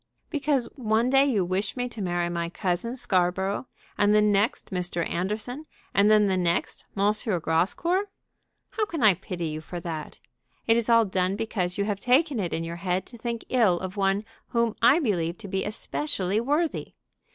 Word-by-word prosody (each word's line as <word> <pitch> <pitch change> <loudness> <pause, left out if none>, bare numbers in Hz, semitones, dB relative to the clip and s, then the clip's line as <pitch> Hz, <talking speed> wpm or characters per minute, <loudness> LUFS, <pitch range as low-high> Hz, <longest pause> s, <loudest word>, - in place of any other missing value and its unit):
"Because 290 -5 +1
one 230 0 +1
day 270 +1 +6
you 210 -9 +1
wish 185 +7 -2
me 245 0 -1
to 230 - -8
marry 175 -2 0
my 170 -1 -2
cousin 185 +6 -2
Scarborough, 190 0 0 0.3
and 205 +1 +4
the - - +6
next 210 +1 +1
Mr. 175 -2 -2
Anderson, 215 - -3 0.3
and 200 +1 +4
then 215 -1 +6
the 190 -2 +1
next 175 -1 -1
M. 200 +2 +3 0.3
Grascour? 190 - +1 0.7
How 430 - 0
can 325 - -3
I 210 -3 +7
pity 175 -2 -5
you 155 0 -5
for 175 +2 -7
that? 160 -3 -6 0.5
It 225 - +4
is 235 0 0
all 230 -1 +6
done 185 -1 0
because 200 -5 -2
you 200 - +1
have 205 -2 -2
taken 260 +3 +2
it 180 -4 -2
in 165 - -2
your 165 +1 -5
head 185 0 -1
to 235 - -13
think 235 -1 -4
ill 215 -9 +3
of 185 0 -6
one 195 +1 +1 0.2
whom 235 -2 0
I 250 +6 +6
believe 175 - 0
to 225 - -8
be 190 0 -1
especially 210 -2 -2
worthy. 295 +6 -1
205 Hz, 185 wpm, -26 LUFS, 180-235 Hz, 0.7 s, I